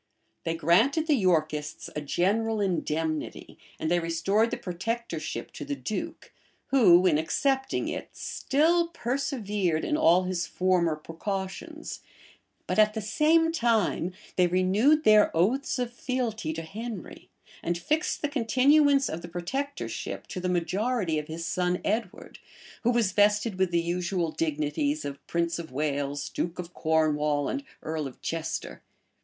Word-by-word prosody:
They 165 Hz, -, 0 dB
granted 225 Hz, -, +3 dB
the 315 Hz, -, +3 dB
Yorkists 155 Hz, -, 0 dB
a 150 Hz, -, -2 dB
general 210 Hz, +9 st, 0 dB
indemnity, 160 Hz, -5 st, -2 dB, 0.2 s
and 160 Hz, -, -1 dB
they 175 Hz, -, +4 dB
restored 175 Hz, +7 st, +1 dB
the -, -, -3 dB
protectorship 180 Hz, -4 st, -4 dB
to -, -, -7 dB
the 145 Hz, -, -3 dB
duke, 215 Hz, -, -5 dB, 0.4 s
who, 190 Hz, -9 st, +6 dB
in 155 Hz, -5 st, +4 dB
accepting 265 Hz, -, 0 dB
it, -, -, -4 dB
still 335 Hz, +5 st, +1 dB
persevered 230 Hz, -, -1 dB
in 300 Hz, -, 0 dB
all 180 Hz, -, +5 dB
his 180 Hz, -1 st, -2 dB
former 180 Hz, -3 st, +1 dB
precautions; 190 Hz, +5 st, -5 dB, 0.7 s
but -, -, 0 dB
at 215 Hz, 0 st, +5 dB
the -, -, -1 dB
same 315 Hz, +9 st, +3 dB
time 230 Hz, -, +1 dB, 0.2 s
they 180 Hz, -1 st, +5 dB
renewed 200 Hz, -, +3 dB
their 215 Hz, -5 st, +6 dB
oaths 250 Hz, +12 st, +1 dB
of 245 Hz, -1 st, -2 dB
fealty 240 Hz, -9 st, -2 dB
to 165 Hz, +1 st, -5 dB
Henry, 215 Hz, +3 st, -7 dB, 0.3 s
and 170 Hz, 0 st, -1 dB
fixed 305 Hz, -, -1 dB
the -, -, +2 dB
continuance 280 Hz, +2 st, +4 dB
of 160 Hz, -, -4 dB
the 170 Hz, -, -8 dB
protectorship 270 Hz, +12 st, -4 dB
to -, -, -6 dB
the 180 Hz, 0 st, -2 dB
majority 180 Hz, 0 st, 0 dB
of 150 Hz, -, -7 dB
his 165 Hz, +1 st, -5 dB
son 180 Hz, 0 st, 0 dB
Edward, 215 Hz, -2 st, -3 dB, 0.4 s
who 240 Hz, -, +2 dB
was 235 Hz, -5 st, +2 dB
vested 205 Hz, 0 st, +2 dB
with 190 Hz, -1 st, +3 dB
the 170 Hz, -1 st, +2 dB
usual 175 Hz, 0 st, -1 dB
dignities 165 Hz, -, -1 dB
of 140 Hz, 0 st, -7 dB
prince 170 Hz, 0 st, -1 dB
of 165 Hz, -4 st, -7 dB
Wales, 145 Hz, 0 st, -2 dB
duke 170 Hz, 0 st, -3 dB
of 180 Hz, -1 st, -7 dB
Cornwall, 150 Hz, -2 st, +1 dB
and 280 Hz, -, -3 dB, 0.2 s
earl 155 Hz, -2 st, -2 dB
of 130 Hz, -, -12 dB
Chester. 165 Hz, -1 st, -4 dB
185 Hz, 145 wpm, -27 LUFS, 165-240 Hz, 0.7 s, who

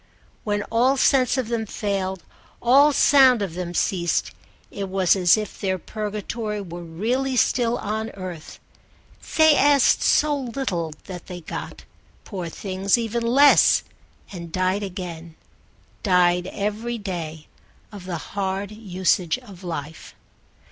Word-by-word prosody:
When 205 Hz, -1 st, -1 dB
all 250 Hz, +4 st, +3 dB
sense 255 Hz, -1 st, +3 dB
of 255 Hz, -4 st, -1 dB
them 225 Hz, -2 st, -2 dB
failed, 190 Hz, -4 st, -3 dB, 0.4 s
all 275 Hz, +5 st, +5 dB
sound 265 Hz, -5 st, +5 dB
of 185 Hz, -5 st, -4 dB
them 175 Hz, 0 st, -5 dB
ceased, 175 Hz, -2 st, 0 dB, 0.4 s
it 195 Hz, -1 st, -5 dB
was 190 Hz, -1 st, +3 dB
as 180 Hz, -2 st, +4 dB
if 215 Hz, -1 st, -6 dB
their 190 Hz, -2 st, 0 dB
purgatory 210 Hz, +2 st, -4 dB
were 175 Hz, -3 st, -7 dB
really 235 Hz, +11 st, -2 dB
still 240 Hz, -1 st, +2 dB
on 220 Hz, +2 st, -3 dB
earth: 180 Hz, -4 st, -8 dB, 0.8 s
they 315 Hz, -1 st, +6 dB
asked 285 Hz, -2 st, +4 dB
so 300 Hz, -1 st, +3 dB
little 240 Hz, -, -3 dB
that 180 Hz, -2 st, -9 dB
they 180 Hz, -1 st, -8 dB
got, -, -, -7 dB, 0.4 s
poor 180 Hz, -5 st, -5 dB
things, 195 Hz, +3 st, 0 dB
even 235 Hz, 0 st, -2 dB
less, 270 Hz, +5 st, +5 dB, 0.5 s
and 170 Hz, -3 st, -8 dB
died 185 Hz, +3 st, 0 dB
again, 175 Hz, -4 st, -7 dB, 0.7 s
died 180 Hz, -2 st, +3 dB
every 215 Hz, +4 st, -3 dB
day, 165 Hz, -7 st, -6 dB, 0.5 s
of 200 Hz, -4 st, -10 dB
the 180 Hz, -2 st, -3 dB, 0.2 s
hard 195 Hz, 0 st, -2 dB
usage 185 Hz, -5 st, 0 dB
of 195 Hz, -2 st, -14 dB
life. 160 Hz, -2 st, -7 dB
200 Hz, 130 wpm, -23 LUFS, 180-235 Hz, 0.8 s, they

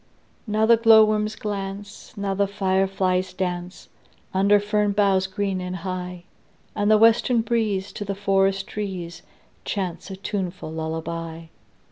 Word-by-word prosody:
Now 215 Hz, +1 st, +2 dB
the 230 Hz, +1 st, +6 dB
glowworms 215 Hz, -1 st, +5 dB
glance, 200 Hz, 0 st, -6 dB
Now 200 Hz, -1 st, -1 dB
the 200 Hz, +1 st, +1 dB
fireflies 190 Hz, -1 st, 0 dB
dance, 180 Hz, -1 st, -4 dB, 0.5 s
Under 200 Hz, +2 st, +4 dB
fern 205 Hz, 0 st, 0 dB
boughs 195 Hz, -2 st, +2 dB
green 195 Hz, -1 st, -2 dB
and 180 Hz, 0 st, -4 dB
high; 180 Hz, 0 st, -5 dB, 0.5 s
And 205 Hz, 0 st, +1 dB
the 215 Hz, -, +6 dB
western 230 Hz, +2 st, +4 dB
breeze 215 Hz, -4 st, -1 dB
To -, -, -5 dB
the 200 Hz, -1 st, -3 dB
forest 195 Hz, -1 st, +1 dB
trees 180 Hz, -5 st, -5 dB, 0.4 s
Chants 190 Hz, -2 st, -4 dB
a 190 Hz, -, -6 dB
tuneful 185 Hz, -4 st, -4 dB
lullaby. 160 Hz, +1 st, -5 dB
195 Hz, 130 wpm, -23 LUFS, 185-205 Hz, 0.5 s, the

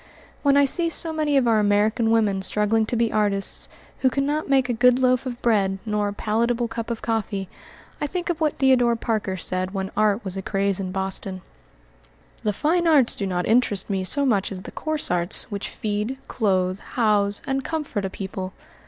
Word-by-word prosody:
When 280 Hz, -1 st, +3 dB
I 285 Hz, -, +6 dB
see 335 Hz, +5 st, +3 dB
so 325 Hz, 0 st, -1 dB
many 300 Hz, -2 st, +1 dB
of 255 Hz, -3 st, +3 dB
our 225 Hz, -2 st, +4 dB
American 210 Hz, +2 st, +2 dB
women 215 Hz, -4 st, +2 dB
struggling 210 Hz, +3 st, +1 dB
to 240 Hz, -, -2 dB
be 230 Hz, -1 st, +1 dB
artists, 205 Hz, -2 st, -1 dB, 0.3 s
who 260 Hz, -, +3 dB
cannot 285 Hz, +4 st, -1 dB
make 265 Hz, -2 st, +3 dB
a 245 Hz, -, 0 dB
good 250 Hz, +2 st, +4 dB
loaf 255 Hz, 0 st, +2 dB
of 245 Hz, -1 st, -5 dB
bread 200 Hz, -5 st, +2 dB
nor 210 Hz, -1 st, 0 dB
a 205 Hz, -, -3 dB
palatable 235 Hz, +3 st, 0 dB
cup 230 Hz, 0 st, -5 dB
of 235 Hz, -1 st, -4 dB
coffee, 215 Hz, -4 st, -2 dB, 0.5 s
I 295 Hz, -, 0 dB
think 355 Hz, +3 st, -2 dB
of 335 Hz, -, -6 dB
what 305 Hz, -2 st, +1 dB
Theodore 250 Hz, -3 st, +4 dB
Parker 215 Hz, -4 st, -2 dB
said 185 Hz, +2 st, -1 dB
when 190 Hz, 0 st, -3 dB
art 210 Hz, +1 st, +1 dB
was 190 Hz, -1 st, -5 dB
a 195 Hz, -, -3 dB
craze 195 Hz, 0 st, -1 dB
in 185 Hz, -1 st, -4 dB
Boston. 190 Hz, -1 st, -3 dB, 1.0 s
"The 210 Hz, -, 0 dB
fine 335 Hz, -, +1 dB
arts 285 Hz, -7 st, +4 dB
do 200 Hz, -, -3 dB
not 180 Hz, -1 st, -1 dB
interest 215 Hz, -4 st, +1 dB
me 190 Hz, -1 st, -1 dB
so 280 Hz, +9 st, +2 dB
much 205 Hz, -7 st, +1 dB
as 185 Hz, -1 st, -7 dB
the -, -, -9 dB
coarse 310 Hz, -, -1 dB
arts 175 Hz, +6 st, +2 dB
which 200 Hz, -1 st, -4 dB
feed, 210 Hz, +4 st, -3 dB
clothe, 185 Hz, -4 st, 0 dB
house, 205 Hz, -4 st, 0 dB
and 270 Hz, 0 st, -1 dB
comfort 295 Hz, -11 st, -3 dB
a 195 Hz, -, -2 dB
people. 190 Hz, 0 st, -6 dB
220 Hz, 195 wpm, -23 LUFS, 195-255 Hz, 1.0 s, I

